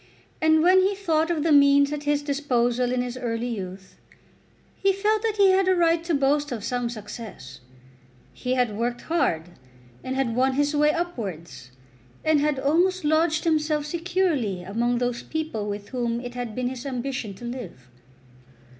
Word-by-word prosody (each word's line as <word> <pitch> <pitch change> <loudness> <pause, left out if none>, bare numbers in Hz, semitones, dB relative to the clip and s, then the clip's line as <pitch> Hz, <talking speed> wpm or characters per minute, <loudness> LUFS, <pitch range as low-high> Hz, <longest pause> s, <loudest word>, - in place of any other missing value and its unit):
And, 315 0 +4
when 370 +2 +6
he 390 +2 +2
thought 325 -5 0
of 320 -4 0
the 325 - +2
means 280 0 +5
at 295 0 -5
his 290 0 +1
disposal 250 -4 0
in 250 0 0
his 250 0 -5
early 235 -1 -2
youth, 190 -1 -8 0.8
he 390 - +2
felt 420 +2 +1
that 440 -2 -1
he 395 -2 +6
had 380 0 +3
a 375 - +4
right 335 -1 +2
to 340 -2 +1
boast 285 +1 +1
of 225 -4 -4
some 245 0 -2
success. 215 - -9 0.7
He 255 0 -2
had 245 -5 +1
worked 240 +2 -2
hard, 175 - 0 0.5
and 260 - -3
had 260 -4 0
won 260 +2 +2
his 290 +2 +1
way 300 +1 +4
upwards, 180 - -5 0.6
and 310 -1 +4
had 295 -1 +1
almost 345 +7 +2
lodged 315 +1 +2
himself 305 -2 +1
securely 330 - -1
among 235 +6 0
those 245 -1 -1
people 305 -10 -4
with 205 0 -6
whom 240 -2 -2
it 245 0 -7
had 245 -3 -5
been 250 -1 -1
his 255 -1 -7
ambition 255 -5 -4
to 240 - -10
live. 230 - -7
270 Hz, 170 wpm, -25 LUFS, 235-315 Hz, 0.8 s, when